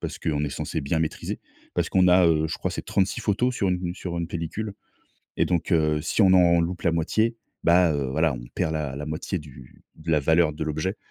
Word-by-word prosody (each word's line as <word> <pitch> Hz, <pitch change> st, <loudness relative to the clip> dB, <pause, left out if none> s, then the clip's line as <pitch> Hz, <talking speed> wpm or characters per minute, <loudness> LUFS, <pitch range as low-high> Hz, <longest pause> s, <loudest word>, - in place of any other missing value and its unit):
parce -, -, -5 dB
qu'on 75 Hz, -2 st, -1 dB
est 70 Hz, -, -3 dB
censé 70 Hz, -, -3 dB
bien 80 Hz, +4 st, -1 dB
maîtriser. 80 Hz, -, -3 dB, 0.3 s
Parce -, -, 0 dB
qu'on 90 Hz, -1 st, +3 dB
a, 90 Hz, 0 st, +6 dB
heu, 80 Hz, -1 st, +3 dB
je 80 Hz, -, -3 dB
crois -, -, -2 dB
c'est -, -, -5 dB
36 95 Hz, 0 st, 0 dB
photos 120 Hz, +5 st, +1 dB
sur 100 Hz, -5 st, 0 dB
une 90 Hz, -1 st, -1 dB
sur 90 Hz, -2 st, -5 dB
une 85 Hz, -1 st, -3 dB
pellicule 95 Hz, +5 st, -4 dB, 0.6 s
et -, -, +3 dB
donc 90 Hz, +1 st, -1 dB
heu, 75 Hz, -2 st, +2 dB
si 85 Hz, -, -1 dB
on 95 Hz, -2 st, +6 dB
en 85 Hz, -2 st, +5 dB
loupe 85 Hz, +2 st, -3 dB
la 85 Hz, -, +2 dB
moitié, 110 Hz, +8 st, +1 dB, 0.3 s
bah, 85 Hz, 0 st, +5 dB
heu, 70 Hz, -2 st, -1 dB
voilà 80 Hz, 0 st, +1 dB
on -, -, -8 dB
perd 80 Hz, 0 st, -1 dB
la 75 Hz, -4 st, -3 dB
la 75 Hz, +2 st, -6 dB
moitié 80 Hz, +4 st, -3 dB
du 65 Hz, -4 st, -14 dB
de 80 Hz, -, -6 dB
la 75 Hz, -2 st, +3 dB
valeur 80 Hz, +1 st, +3 dB
de 80 Hz, -, -4 dB
l'objet 80 Hz, +6 st, -2 dB
85 Hz, 230 wpm, -25 LUFS, 75-90 Hz, 0.6 s, a